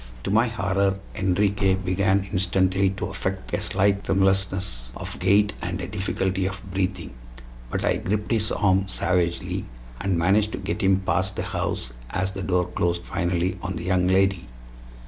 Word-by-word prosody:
To - - -2
my 115 +4 +4
horror 100 -3 +1 0.2
Enriquez 95 0 +2
began 95 +1 +2
instantly 95 0 +2
to 95 +1 -3
affect 95 0 -4
a - - 0
slight 100 +1 +1
tremulousness 95 -9 0
of - - -6
gait 105 +1 +4
and 90 +2 -3
a 90 - -3
difficulty 95 -1 -1
of 95 0 -5
breathing; 95 -4 -2 0.6
but - - -1
I - - +2
gripped 105 +2 -2
his 110 -2 +1
arm 95 -1 +2
savagely, 90 -2 0 0.3
and 95 -2 0
managed 100 +5 +3
to - - -2
get 100 +2 -3
him 95 -1 +3
past 95 0 0
the - - -2
house - - -3 0.2
as 95 +6 -1
the 95 0 -6
door 90 -1 +1
closed 85 -1 0
finally 90 0 -1
on 95 -2 -3
the 85 - -5
young 90 0 +2
lady. 95 -2 +2
95 Hz, 165 wpm, -25 LUFS, 90-100 Hz, 0.6 s, my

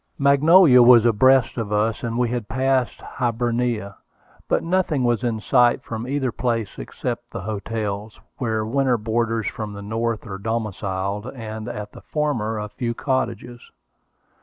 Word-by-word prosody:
Magnolia 140 0 +6
was 120 -1 +7
abreast 125 +2 +4
of 110 -2 -4
us, 105 +2 0
and 115 -1 -3
we 120 -1 +1
had 120 -3 -3
passed 130 -1 0
Hibernia; 120 -3 -2 0.5
but - - +1
nothing 170 -6 0
was 120 -1 +1
in 115 -2 -1
sight 120 +2 +3
from 115 +1 -5
either 135 -2 -1
place 115 -3 -2
except 120 -1 -5
the - - -6
hotels, 105 0 -4 0.2
where 110 -3 -1
winter 130 +1 +1
boarders 115 0 -1
from 105 0 -4
the 100 0 -8
North 115 +2 -2
are 95 -3 -6
domiciled, 105 -2 -3
and 110 -2 -6
at 105 -3 -6
the - - -13
former 120 -8 -2
a 105 0 -4
few 115 +1 -3
cottages. 120 -3 -3
115 Hz, 150 wpm, -22 LUFS, 110-125 Hz, 0.5 s, was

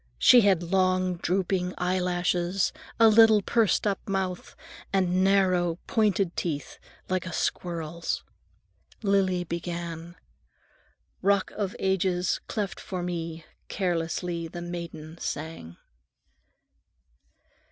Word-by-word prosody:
She 245 - +7
had 195 -5 +3
long, 185 0 +1
drooping 180 0 -1
eyelashes, 180 0 0 0.3
a 225 - +8
little 220 -1 +6
pursed 225 -1 +2
up 200 -1 -2
mouth, 190 -2 -3 0.4
and 185 -1 +2
narrow, 185 -3 +3
pointed 200 -5 +1
teeth, 145 -5 -4 0.3
like 185 0 -1
a - - -5
squirrel's. 170 -1 -2 0.8
Lily 190 -3 +2
began:— 170 0 -5 1.1
"Rock 200 0 +2
of 200 -3 -3
Ages, 185 -1 0
cleft 205 -3 -3
for 185 -2 -5
me, 165 -2 -4 0.2
carelessly 170 -2 -2
the 175 +1 -7
maiden 170 -2 -7
sang." 145 - -5
180 Hz, 100 wpm, -27 LUFS, 170-195 Hz, 1.1 s, a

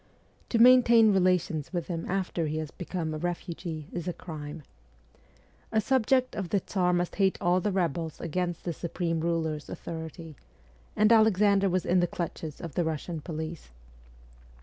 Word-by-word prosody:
To 235 - +1
maintain 235 -2 +7
relations 180 -5 +1
with 175 -3 -2
him 165 -2 -4
after 180 -3 -1
he 155 +1 -2
has 155 -1 -4
become 175 -3 -4
a 155 - -4
refugee 170 -2 -4
is 175 0 -5
a 180 - -1
crime. 150 -2 -8 1.1
A 220 - +3
subject 255 +2 +2
of 190 -4 -3
the 205 - +2
Tsar 180 -1 0
must 175 0 -1
hate 195 -2 +2
all 180 +1 +2
the 210 - 0
rebels 170 -4 -1
against 175 +1 -3
the 170 - -2
supreme 165 0 -2
ruler's 160 -2 -2
authority 160 -1 -7 0.6
and 215 +1 +4
Alexander 205 -3 +4
was 185 0 0
in 180 +1 +3
the 175 - +2
clutches 165 -3 -5
of 165 -4 -7
the 175 - +1
Russian 160 +1 -3
police. 160 0 -6
175 Hz, 160 wpm, -28 LUFS, 160-190 Hz, 1.1 s, maintain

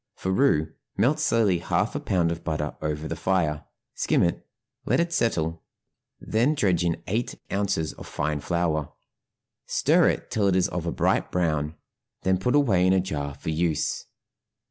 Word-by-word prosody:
For 95 - -2
roux 95 - +2 0.2
melt 130 +9 +3
slowly 110 - +2
half - - 0
a - - -2
pound 85 -3 +1
of 85 - -5
butter 75 -2 -2
over 75 0 -2
the 80 - -3
fire, 80 -3 0 0.3
skim - - +2
it, 85 0 -1 0.4
let - - +1
it 170 0 0
settle, 80 - 0 0.6
then 120 +8 +1
dredge 90 - +2
in 85 -1 -1
eight 115 +5 -2 0.2
ounces 100 -6 0
of - - -11
fine 75 0 -2
flour, 80 -2 -1 0.7
stir - - +3
it - - -3
till 105 -2 +2
it 95 - +3
is 95 - +3
of 85 -1 -4
a - - 0
bright - - +1
brown, 80 -3 0 0.5
then 95 -1 +2
put 125 +8 +1
away 100 -11 +4
in 95 - +4
a 95 - +4
jar 70 -6 -3
for 80 - -4
use. 80 -1 -1
85 Hz, 170 wpm, -26 LUFS, 80-100 Hz, 0.7 s, away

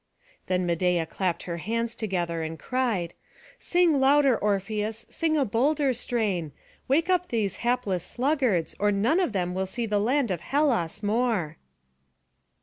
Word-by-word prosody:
Then 180 -1 0
Medeia 175 0 +1
clapped 180 +1 -2
her 170 -1 -4
hands 230 +6 -2
together, 175 -7 -2
and 160 0 -4
cried, 225 -5 -1 0.5
"Sing 345 -5 +2
louder, 275 -1 +5
Orpheus, 210 +2 -2
sing 320 -2 0
a 280 - +2
bolder 270 +5 +1
strain; 205 - -2 0.3
wake 315 +6 +2
up 360 -1 +2
these 215 -5 -1
hapless 235 -7 -1
sluggards, 250 - 0
or 205 0 +3
none 225 - +2
of 360 - +1
them 180 -3 -1
will 190 +1 -2
see 235 +5 -3
the 210 -2 0
land 245 +2 +1
of 175 -3 -2
Hellas 235 - 0
more." 205 -8 0
220 Hz, 145 wpm, -26 LUFS, 180-260 Hz, 0.5 s, louder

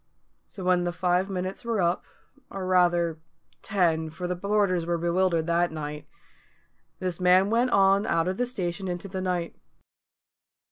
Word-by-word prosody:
So 190 - -9
when 180 -1 +2
the 175 - -1
five 180 +2 0
minutes 185 0 -4
were 230 -3 -1
up 175 0 0 0.4
or 195 -1 -5
rather, 175 -3 +2 0.4
ten, 165 -5 +1
for 165 +3 -7
the 180 0 -1
porters 200 -2 +1
were 170 +1 -1
bewildered 170 -1 +1
that 170 0 +1
night 150 -1 -6 0.9
this 185 -2 -4
man 185 +2 +4
went 240 +2 +2
on 195 -1 +4
out 165 0 +1
of 185 +1 -2
the 245 - 0
station 190 -5 -4
into 180 +2 -4
the 190 -1 -5
night. 180 -2 -2
180 Hz, 155 wpm, -26 LUFS, 170-190 Hz, 0.9 s, man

